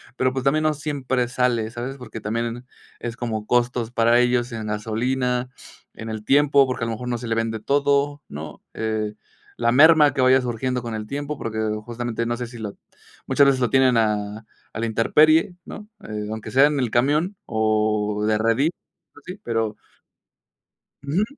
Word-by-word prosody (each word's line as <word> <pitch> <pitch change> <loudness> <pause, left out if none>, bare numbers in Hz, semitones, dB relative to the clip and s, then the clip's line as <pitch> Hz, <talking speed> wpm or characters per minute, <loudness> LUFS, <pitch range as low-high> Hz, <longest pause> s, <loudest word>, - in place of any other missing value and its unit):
pero, 130 -1 +1
pues, 130 0 -3
también 150 +3 +3
no 155 -1 +2
siempre 135 -4 -2
sale, 120 -3 0
¿sabes? 125 +4 -5
Porque 125 -3 -9
también 115 +3 -3 0.3
es 120 0 -5
como 110 -3 -4
costos 120 -1 +1
para 115 0 +4
ellos 125 0 +1
en 110 -2 -5
gasolina, 125 +4 -1 0.5
en 110 - -7
el 110 -1 -5
tiempo, 140 +2 +4
porque 130 -2 -3
a - - -1
lo - - -2
mejor 125 +3 -6
no 120 -1 -1
se 120 0 -7
le 115 - 0
vende 115 -1 -1
todo, 145 +2 +1
¿no?, 75 +3 -8
eh, 110 -1 -2 0.4
la 115 0 +2
merma 150 +2 +6
que 140 - -5
vaya 130 0 +5
surgiendo 125 +1 -2
con 115 -1 -5
el 110 -1 -5
tiempo, 145 +3 -4
porque 110 -3 -4 0.3
justamente 120 -1 -3
no 120 0 -1
sé 120 +1 -4
si 120 0 -11
la 105 -3 -5 0.5
muchas 140 - +4
veces 135 -2 +2
lo 125 - +2
tienen 130 -2 +4
a 105 -1 -1 0.3
a 110 - -5
la 115 - 0
intemperie, 155 +10 +3
¿no?, 210 0 -9 0.2
eh, 105 -1 -4
aunque 110 0 -6
sea 135 +2 +6
en 150 - -1
el 120 -4 -1
camión, 150 +10 +1
o 105 -1 0
de 110 0 +2
redilas 115 +9 +1 0.4
así, 180 +6 -9
pero 115 -2 -1 1.3
Uju, 155 +9 0
120 Hz, 180 wpm, -23 LUFS, 110-135 Hz, 1.3 s, merma